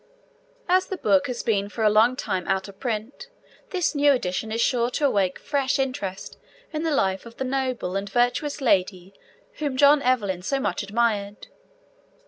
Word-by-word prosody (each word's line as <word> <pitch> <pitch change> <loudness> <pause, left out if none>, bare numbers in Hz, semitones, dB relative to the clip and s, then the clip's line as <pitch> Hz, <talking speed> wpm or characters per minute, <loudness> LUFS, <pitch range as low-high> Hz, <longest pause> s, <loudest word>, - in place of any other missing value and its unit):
As 370 +1 +3
the 380 - -4
book 200 - +2
has 245 -2 -4
been 205 -3 0
for 220 +2 -4
a 215 - +5
long 225 +4 +4
time 185 -8 -3
out 190 0 0
of 200 -1 -14
print, 225 +1 -4 0.4
this 360 -4 0
new 290 -1 +4
edition 220 -2 -2
is 225 - -2
sure 235 0 +2
to 290 +4 -1
awake 195 -8 +1
fresh 275 -2 -1
interest 230 -8 -4 0.3
in 305 - -2
the 325 - 0
life 195 -8 0
of 230 - -14
the - - -2
noble 255 -7 -2
and 195 +1 -3
virtuous 245 +6 0
lady 190 -5 +1 0.5
whom 285 -4 -2
John 285 +1 +6
Evelyn 210 -9 0
so 270 +9 -1
much - - -1
admired. 205 -1 -1
235 Hz, 175 wpm, -24 LUFS, 200-270 Hz, 0.5 s, John